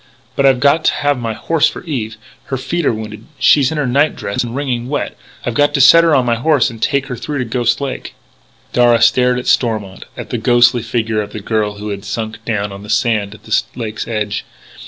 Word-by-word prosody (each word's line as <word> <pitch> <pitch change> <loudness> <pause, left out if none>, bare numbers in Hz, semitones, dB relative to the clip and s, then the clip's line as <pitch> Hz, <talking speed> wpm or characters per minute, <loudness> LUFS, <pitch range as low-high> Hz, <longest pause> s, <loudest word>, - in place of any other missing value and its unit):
"But 140 - +3
I've 130 -2 +3
got 145 +4 +3
to - - +4
have 145 -2 0
my 115 -2 -3
horse 160 +7 +1
for - - -6
Eve. 115 -10 -4 0.3
Her 135 - -3
feet 140 +5 -2
are - - +4
wounded. 110 0 -7
She's 140 -2 +4
in 160 - -3
her 150 - 0
night 140 +5 +2
dress 100 +3 -3
and 120 0 -6
wringing 130 -3 -2
wet. 145 - -3 0.3
I've 120 - -1
got 145 +4 +2
to - - +1
set 155 +5 +7
her 165 -3 +4
on 130 - +2
my 120 - +2
horse 145 0 +2
and 115 -1 -12
try - - +3
to - - -8
take 140 -1 0
her 125 - -5
through 145 +4 -5
to 130 - -1
Ghost 120 0 0
Lake." 140 -2 -5 0.6
Darragh 120 -1 +4
stared 125 +1 +3
at 125 - -4
Stormont, 110 -6 0
at - - -7
the - - -2
ghostly 120 0 +4
figure 110 -1 -1
of 105 0 -8
the 110 - -5
girl 105 0 -1
who 105 +1 -6
had 100 -1 -5
sunk 110 +2 -5
down 105 -3 -2
on 100 0 -9
the 105 - -11
sand 105 -3 0
at - - -18
the 110 - +1
lake's 110 -3 -5
edge. 105 -2 -2
120 Hz, 240 wpm, -16 LUFS, 110-135 Hz, 0.6 s, set